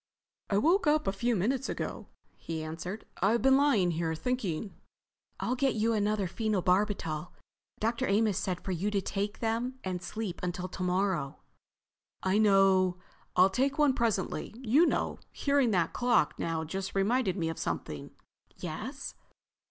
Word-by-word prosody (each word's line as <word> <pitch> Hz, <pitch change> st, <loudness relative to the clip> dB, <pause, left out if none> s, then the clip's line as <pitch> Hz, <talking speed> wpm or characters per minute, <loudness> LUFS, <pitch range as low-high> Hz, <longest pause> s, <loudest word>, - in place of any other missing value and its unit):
"I 200 Hz, -, +2 dB
woke 335 Hz, -, +3 dB
up 305 Hz, +1 st, +3 dB
a -, -, +1 dB
few 235 Hz, +4 st, 0 dB
minutes 250 Hz, +8 st, 0 dB
ago," -, -, -4 dB, 0.3 s
he 160 Hz, -1 st, -5 dB
answered. 170 Hz, +6 st, -6 dB, 0.2 s
"I've 220 Hz, +6 st, +3 dB
been 265 Hz, 0 st, +6 dB
lying 270 Hz, -11 st, +3 dB
here—thinking." 170 Hz, +4 st, -2 dB, 0.7 s
"I'll 245 Hz, -, 0 dB
get 260 Hz, -1 st, +1 dB
you 225 Hz, +1 st, +2 dB
another 210 Hz, -1 st, +1 dB
phenobarbital. 185 Hz, -5 st, 0 dB, 0.5 s
Dr. 225 Hz, +2 st, 0 dB
Amos 205 Hz, 0 st, +2 dB
said 185 Hz, -2 st, -2 dB
for 190 Hz, -, -4 dB
you 185 Hz, +4 st, -1 dB
to 205 Hz, -1 st, +1 dB
take 200 Hz, +2 st, -3 dB
them 235 Hz, +3 st, -1 dB
and 185 Hz, -2 st, -3 dB
sleep 205 Hz, -2 st, -5 dB
until 180 Hz, 0 st, -3 dB
tomorrow." 180 Hz, -5 st, -1 dB, 0.9 s
"I 190 Hz, +2 st, +2 dB
know. 195 Hz, -3 st, +4 dB, 0.4 s
I'll 185 Hz, +2 st, +6 dB
take 270 Hz, +7 st, +1 dB
one 295 Hz, -3 st, +4 dB
presently. 220 Hz, -4 st, -1 dB
You 260 Hz, +7 st, +4 dB
know—hearing 280 Hz, -3 st, 0 dB
that 180 Hz, -6 st, +1 dB
clock 245 Hz, -10 st, +2 dB, 0.3 s
just 190 Hz, +5 st, -4 dB
now -, -, +3 dB
reminded 205 Hz, -1 st, +1 dB
me 165 Hz, -3 st, 0 dB
of 165 Hz, -, -5 dB
something." 75 Hz, -4 st, -4 dB, 0.5 s
"Yes?" 240 Hz, -, -5 dB
200 Hz, 145 wpm, -30 LUFS, 180-240 Hz, 0.9 s, been